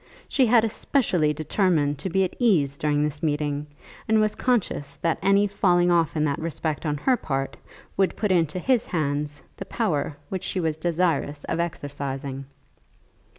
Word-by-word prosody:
She 260 Hz, -3 st, +3 dB
had 230 Hz, -1 st, +5 dB
especially 210 Hz, -, +1 dB
determined 155 Hz, -2 st, +1 dB
to 190 Hz, -, -3 dB
be 190 Hz, +2 st, +2 dB
at 185 Hz, -, -3 dB
ease 165 Hz, -, +3 dB
during 145 Hz, 0 st, +1 dB
this 150 Hz, -1 st, -2 dB
meeting, 150 Hz, -1 st, -1 dB, 0.4 s
and 220 Hz, 0 st, +4 dB
was 215 Hz, 0 st, +2 dB
conscious 180 Hz, -, -1 dB
that 165 Hz, +2 st, 0 dB
any 200 Hz, +1 st, +4 dB
falling 180 Hz, -3 st, +2 dB
off 165 Hz, -3 st, +2 dB
in 150 Hz, -, +2 dB
that 145 Hz, -2 st, 0 dB
respect 160 Hz, -1 st, -3 dB
on 150 Hz, 0 st, 0 dB
her 260 Hz, -, +2 dB
part 135 Hz, -, -3 dB, 0.4 s
would 195 Hz, -1 st, +2 dB
put 210 Hz, -3 st, 0 dB
into 165 Hz, -2 st, +2 dB
his 245 Hz, +5 st, +1 dB
hands 145 Hz, -2 st, -2 dB
the -, -, -6 dB
power 155 Hz, -10 st, -1 dB
which 190 Hz, -2 st, -4 dB
she 190 Hz, -, -2 dB
was 160 Hz, -3 st, 0 dB
desirous 160 Hz, -3 st, 0 dB
of -, -, -3 dB
exercising. 140 Hz, -4 st, -4 dB
160 Hz, 165 wpm, -25 LUFS, 145-190 Hz, 0.4 s, had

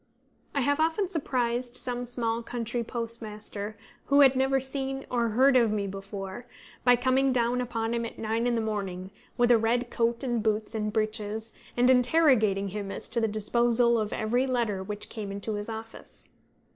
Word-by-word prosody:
I 280 Hz, -, +2 dB
have 285 Hz, +3 st, +1 dB
often 330 Hz, +4 st, +1 dB
surprised 250 Hz, -7 st, -1 dB
some 245 Hz, 0 st, -3 dB
small 230 Hz, -1 st, -2 dB
country 235 Hz, 0 st, -3 dB
postmaster, 215 Hz, -3 st, -5 dB, 0.3 s
who 280 Hz, +1 st, +5 dB
had 270 Hz, -1 st, +7 dB
never 265 Hz, +1 st, +2 dB
seen 270 Hz, 0 st, -3 dB
or 235 Hz, -2 st, +1 dB
heard 260 Hz, +5 st, +4 dB
of 235 Hz, -3 st, +5 dB
me 210 Hz, -1 st, -1 dB
before, 195 Hz, +3 st, -7 dB, 0.4 s
by 245 Hz, 0 st, +6 dB
coming 260 Hz, +2 st, +2 dB
down 245 Hz, 0 st, +1 dB
upon 230 Hz, -2 st, -2 dB
him 235 Hz, 0 st, -1 dB
at 230 Hz, -, -6 dB
nine 225 Hz, +2 st, -1 dB
in 240 Hz, -, +1 dB
the 230 Hz, -, +1 dB
morning, 195 Hz, -4 st, -4 dB, 0.3 s
with 240 Hz, 0 st, +4 dB
a 235 Hz, -, +6 dB
red 240 Hz, +2 st, 0 dB
coat 235 Hz, +2 st, +1 dB
and 240 Hz, -3 st, 0 dB
boots 215 Hz, 0 st, 0 dB
and 215 Hz, -1 st, -2 dB
breeches, 220 Hz, 0 st, -2 dB, 0.2 s
and 245 Hz, +1 st, +4 dB
interrogating 250 Hz, -7 st, +4 dB
him 200 Hz, 0 st, -5 dB
as -, -, -6 dB
to 235 Hz, 0 st, 0 dB
the 225 Hz, -, +2 dB
disposal 235 Hz, +2 st, +2 dB
of 215 Hz, -1 st, -2 dB
every 245 Hz, +5 st, 0 dB
letter 230 Hz, -6 st, 0 dB
which 205 Hz, +2 st, -5 dB
came 210 Hz, -3 st, -6 dB
into 200 Hz, +2 st, -4 dB
his 205 Hz, +1 st, -4 dB
office. 225 Hz, 0 st, -9 dB
235 Hz, 180 wpm, -28 LUFS, 215-250 Hz, 0.4 s, had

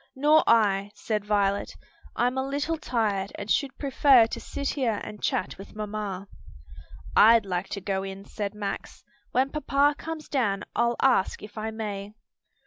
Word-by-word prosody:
"Nor 300 Hz, +3 st, +5 dB
I," 205 Hz, -3 st, +3 dB
said 210 Hz, -1 st, -2 dB
Violet, 200 Hz, -1 st, 0 dB, 0.4 s
"I'm 250 Hz, +1 st, +1 dB
a 265 Hz, -, 0 dB
little 285 Hz, +4 st, -1 dB
tired 215 Hz, -10 st, -1 dB
and 205 Hz, -, -5 dB
should 280 Hz, -3 st, 0 dB
prefer 270 Hz, -3 st, +5 dB
to 225 Hz, -, -5 dB
sit 280 Hz, -1 st, -4 dB
here 235 Hz, -7 st, 0 dB
and 210 Hz, -1 st, -8 dB
chat 185 Hz, -, -1 dB
with 195 Hz, -, -11 dB
mamma." 205 Hz, -2 st, -4 dB, 0.9 s
"I'd 225 Hz, 0 st, +7 dB
like 180 Hz, 0 st, -3 dB
to 200 Hz, -, -4 dB
go 190 Hz, 0 st, -1 dB
in," 195 Hz, 0 st, -7 dB
said 205 Hz, -1 st, -5 dB
Max. 205 Hz, -1 st, -5 dB, 0.3 s
"When 265 Hz, +2 st, +1 dB
papa 290 Hz, -1 st, +2 dB
comes 320 Hz, -1 st, -6 dB
down 210 Hz, -8 st, 0 dB
I'll 235 Hz, 0 st, +2 dB
ask 250 Hz, -9 st, +2 dB
if 210 Hz, -, -11 dB
I 220 Hz, 0 st, -3 dB
may." 210 Hz, -2 st, -5 dB
215 Hz, 160 wpm, -26 LUFS, 200-265 Hz, 0.9 s, I'd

